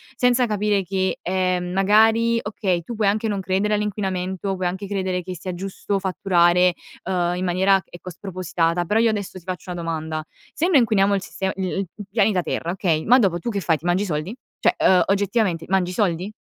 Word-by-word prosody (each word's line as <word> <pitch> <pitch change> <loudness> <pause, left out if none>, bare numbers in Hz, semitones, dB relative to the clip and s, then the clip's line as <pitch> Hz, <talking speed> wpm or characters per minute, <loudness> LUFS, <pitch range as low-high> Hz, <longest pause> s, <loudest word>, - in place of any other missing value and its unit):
senza 250 -1 +3
capire 210 -2 0
che, 190 0 -1
ehm, 185 -1 -1
magari 220 +4 +4
okay, 190 -4 -1
tu 235 - -7
puoi 210 -2 +1
anche 215 +3 +1
non 205 -2 -1
credere 195 +3 0
all'inquinamento, 195 -2 -2
puoi 185 -1 -1
anche 190 +3 -4
credere 185 -2 -2
che 185 +1 -6
sia 180 +2 -6
giusto 195 +2 -3
fatturare, 180 -2 +3 0.3
ehm, 175 -1 0
in 180 - -3
maniera 190 +2 +3
ecco 175 +1 -9
spropositata. 175 -2 -2
Però 215 +5 +1
io 230 - +4
adesso 200 -3 -4
ti - - -22
faccio 185 0 -6
una 175 -1 -5
domanda: 160 -1 -3 0.3
se 335 - 0
noi 360 -5 +4
inquiniamo 205 -4 +3
il 195 - -1
sistema 190 0 -3
i 190 - -5 0.2
il 195 - -1
p - - -10
pianeta 200 -3 +2
terra, 165 +1 -3
okay, 175 -4 0
ma 250 +3 +6
dopo 185 -7 +1
tu 235 - -4
che 205 - -2
fai, 160 0 +1
ti 165 - -15
mangi 175 +3 +2
i - - -2
soldi? 170 +5 -3 0.2
Cioè, - - +3
ehm, 180 -2 +4
oggettivamente 195 -3 0
mangi 185 -1 +1
i - - -6
soldi? 185 -1 -1
190 Hz, 210 wpm, -22 LUFS, 180-205 Hz, 0.3 s, ma